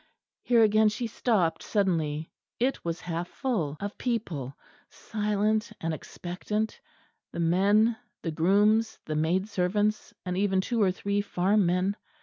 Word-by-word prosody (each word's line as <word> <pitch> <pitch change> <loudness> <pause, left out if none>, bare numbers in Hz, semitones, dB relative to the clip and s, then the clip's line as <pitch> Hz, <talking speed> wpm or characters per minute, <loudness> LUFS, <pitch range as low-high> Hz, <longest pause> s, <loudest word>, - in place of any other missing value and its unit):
Here 235 -2 +4
again 215 0 +5
she 210 +3 -3
stopped 210 -6 +1
suddenly: 160 -7 0 0.3
it 260 +3 0
was 170 0 -3
half 170 0 -3
full 175 - -2
of 205 +1 -5
people, 165 - -3 0.3
silent 215 +1 -1
and 165 0 -2
expectant 185 +7 -4 0.5
the - - -6
men, 200 +7 +3 0.3
the 165 - -2
grooms, 205 +7 +3
the 155 - -3
maid 170 +6 +1
servants, 205 +2 0
and 180 0 -2
even 190 0 +2
two 230 +4 0
or 190 -2 +4
three 200 +2 -1
farm 200 0 +2
men. 180 +3 +1
200 Hz, 135 wpm, -28 LUFS, 175-215 Hz, 0.5 s, again